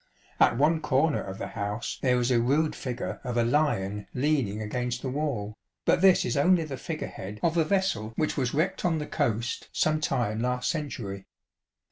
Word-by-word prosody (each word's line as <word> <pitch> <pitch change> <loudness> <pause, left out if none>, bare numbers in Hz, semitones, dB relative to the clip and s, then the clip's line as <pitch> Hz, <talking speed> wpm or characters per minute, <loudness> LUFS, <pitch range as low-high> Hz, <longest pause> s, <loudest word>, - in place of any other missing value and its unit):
At - - +5
one 155 +4 +3
corner 150 +1 +2
of 95 -1 -6
the - - -5
house 105 +1 -4
there 125 -2 +3
is 120 +1 +1
a 120 -2 +4
rude 145 +6 +2
figure 120 -6 -4
of 125 -2 -3
a 120 - +4
lion 105 -7 0
leaning 130 -7 +1
against 125 +3 -3
the 130 - -2
wall, 130 -8 -2 0.3
but 175 - +3
this 190 -1 +6
is 120 - -1
only 170 +4 +4
the 145 -3 -5
figure 155 +4 -4
head 100 +3 -8
of 165 0 +2
a 165 - +4
vessel 155 - 0
which 155 +3 0
was 130 -4 0
wrecked 165 +6 0
on 170 -3 +2
the 150 - -3
coast 115 -2 -1
some 155 0 +2
time 125 -10 0
last 125 +3 0
century. 115 - -5
130 Hz, 190 wpm, -27 LUFS, 115-155 Hz, 0.3 s, this